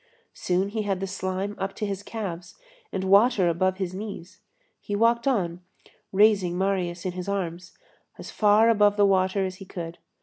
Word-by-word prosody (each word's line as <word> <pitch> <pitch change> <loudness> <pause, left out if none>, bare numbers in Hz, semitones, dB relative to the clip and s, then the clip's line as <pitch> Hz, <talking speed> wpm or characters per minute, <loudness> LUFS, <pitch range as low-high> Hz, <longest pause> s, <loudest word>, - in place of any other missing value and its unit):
Soon 185 +2 -1
he 220 +1 -2
had 195 -3 -1
the 195 - -2
slime 190 +1 -3
up 195 0 -3
to 215 - -3
his 200 -1 -4
calves 185 -5 -6 0.4
and 190 - -3
water 200 +1 +4
above 185 +3 +1
his 185 -2 -3
knees. 195 -2 -8 0.4
He 205 - -4
walked 235 +3 +2
on, 180 -9 0 0.5
raising 195 -3 +3
Marius 185 -2 -1
in 185 - -1
his 180 +2 -6
arms, 185 -2 -4 0.4
as - - -9
far 215 +1 +4
above 205 -1 +3
the 205 - +5
water 190 0 +2
as 185 0 -5
he 195 - -10
could. 170 -2 -7
195 Hz, 175 wpm, -25 LUFS, 185-205 Hz, 0.5 s, the